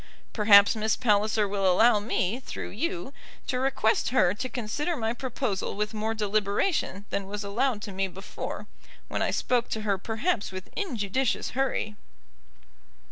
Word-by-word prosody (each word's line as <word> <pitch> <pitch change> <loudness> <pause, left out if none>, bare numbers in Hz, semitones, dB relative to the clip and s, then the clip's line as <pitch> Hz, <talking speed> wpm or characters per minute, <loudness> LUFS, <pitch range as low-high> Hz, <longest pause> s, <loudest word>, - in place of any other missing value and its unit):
Perhaps 205 -1 +7
Miss 220 0 +1
Palliser 210 -2 +2
will 195 -2 +2
allow 220 +4 +5
me, 210 +1 -1
through 265 - -6
you, 335 - -3 0.3
to 250 - -1
request 260 -4 +1
her 185 -8 +3
to 255 +5 -4
consider 260 +9 -2
my 225 0 -1
proposal 245 -7 -3
with 210 +2 -2
more 220 +1 -2
deliberation 205 - 0
than 200 -1 -2
was 205 +1 -4
allowed 215 +2 0
to 205 - -5
me 195 0 -1
before, 190 +2 -7 0.4
when - - -2
I - - +2
spoke 245 -1 0
to 220 - -2
her 200 -3 0
perhaps 225 - -1
with 185 -1 -8
injudicious 255 - -1
hurry. 245 -5 -1
215 Hz, 150 wpm, -27 LUFS, 200-250 Hz, 0.4 s, Perhaps